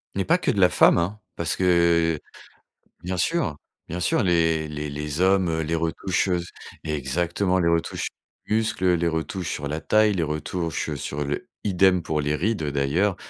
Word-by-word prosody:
Mais -, -, 0 dB
pas -, -, +4 dB
que -, -, 0 dB
de -, -, -2 dB
la -, -, +6 dB
femme, -, -, +5 dB
hein! 100 Hz, +5 st, -2 dB, 0.2 s
Parce 85 Hz, -1 st, -1 dB
que, 85 Hz, -3 st, +3 dB, 0.8 s
bien 90 Hz, +1 st, -3 dB
sûr 120 Hz, -, 0 dB, 0.3 s
bien 90 Hz, +2 st, -4 dB
sûr, 160 Hz, -, +1 dB
les 80 Hz, -3 st, +2 dB
les 75 Hz, 0 st, -5 dB
les 75 Hz, +2 st, -4 dB
hommes, 95 Hz, -2 st, +3 dB
heu, 80 Hz, 0 st, -1 dB
les 80 Hz, +2 st, -2 dB
retouches, 85 Hz, +4 st, -1 dB
heu, 90 Hz, -, +2 dB
s 85 Hz, -, -5 dB, 0.4 s
exactement, 85 Hz, +6 st, 0 dB
les 85 Hz, -2 st, +2 dB
retouches 85 Hz, -1 st, 0 dB, 0.4 s
du 105 Hz, -, 0 dB
muscle, 110 Hz, -4 st, 0 dB
heu, 90 Hz, -1 st, +4 dB
les 85 Hz, 0 st, +1 dB
retouches 80 Hz, +2 st, -3 dB
sur 70 Hz, -1 st, -4 dB
la 80 Hz, +2 st, -3 dB
taille, 110 Hz, -1 st, +3 dB
les 85 Hz, -, -1 dB
retouches, 80 Hz, +2 st, -3 dB
heu, 75 Hz, -, -3 dB
sur 70 Hz, +2 st, -4 dB
le 70 Hz, +1 st, -3 dB, 0.2 s
idem 95 Hz, -2 st, +3 dB
pour 75 Hz, -1 st, -1 dB
les 75 Hz, +1 st, 0 dB
rides, 105 Hz, 0 st, -1 dB
heu, 70 Hz, -2 st, -2 dB
d'ailleurs. 85 Hz, +8 st, +1 dB
85 Hz, 200 wpm, -24 LUFS, 75-95 Hz, 0.8 s, la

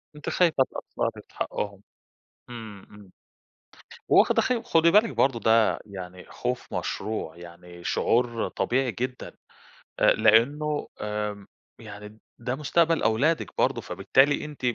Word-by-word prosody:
أنتِ 150 Hz, -, -6 dB
خايفة 165 Hz, -7 st, +3 dB
تقصّري -, -, -4 dB
في -, -, -25 dB
حقهم 100 Hz, -1 st, -4 dB, 0.7 s
إمم، 110 Hz, -5 st, -9 dB
إمم، 100 Hz, -2 st, -15 dB, 1.0 s
وواخدة -, -, +5 dB
خ 255 Hz, -, +1 dB
خُدي 165 Hz, -7 st, +3 dB
بالِك 215 Hz, +3 st, +5 dB
برضه 130 Hz, -3 st, +1 dB
ده 110 Hz, -1 st, +3 dB
يعني 90 Hz, -2 st, -9 dB
خوف 125 Hz, 0 st, -4 dB
مشروع 95 Hz, -6 st, -4 dB
يعني 85 Hz, 0 st, -12 dB
شعور 120 Hz, -1 st, +1 dB
طبيعي 130 Hz, 0 st, 0 dB
جدًا 125 Hz, +5 st, -5 dB, 0.6 s
آآ، -, -, +5 dB
لإنه 145 Hz, +7 st, +2 dB
آمم، 105 Hz, -1 st, -4 dB, 0.3 s
يعني 105 Hz, 0 st, -11 dB, 0.2 s
ده 125 Hz, +2 st, -3 dB
مستقبَل 165 Hz, +3 st, +1 dB
أولادِك 135 Hz, +9 st, +1 dB
برضه، -, -, +1 dB
فبالتالي 140 Hz, +3 st, +2 dB
أنتِ 150 Hz, -2 st, -10 dB
115 Hz, 120 wpm, -26 LUFS, 105-145 Hz, 1.0 s, وواخدة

